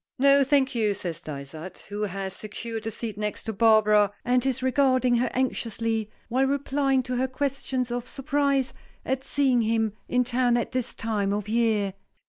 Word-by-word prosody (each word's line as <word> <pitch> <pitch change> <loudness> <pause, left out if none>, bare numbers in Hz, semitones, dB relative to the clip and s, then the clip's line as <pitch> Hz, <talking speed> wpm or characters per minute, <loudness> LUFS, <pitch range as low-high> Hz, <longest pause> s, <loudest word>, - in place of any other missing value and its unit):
"No, 275 +1 +5
thank 270 -1 +2
you," 215 -4 +1
says 170 -4 -5
Dysart, 155 +2 -8
who 205 +1 -4
has 195 -2 -3
secured 220 +1 -6
a - - +1
seat 220 -1 -5
next 210 0 -3
to 220 - -3
Barbara, 210 -1 +5
and 250 0 +2
is 260 -1 -1
regarding 255 -2 +3
her 245 - +1
anxiously, 230 -3 -1 0.2
while 260 +3 +2
replying 275 -1 +1
to 250 0 -3
her 260 +1 +1
questions 260 -2 -2
of 245 0 -3
surprise 275 -1 0 0.3
at 265 0 -1
seeing 265 -4 +2
him 225 -1 +1 0.2
in 250 0 +3
town 245 0 +2
at 240 - -2
this 255 -2 -2
time 210 -3 -1
of 205 0 -2
year. 215 -3 +1
240 Hz, 170 wpm, -26 LUFS, 210-260 Hz, 0.3 s, No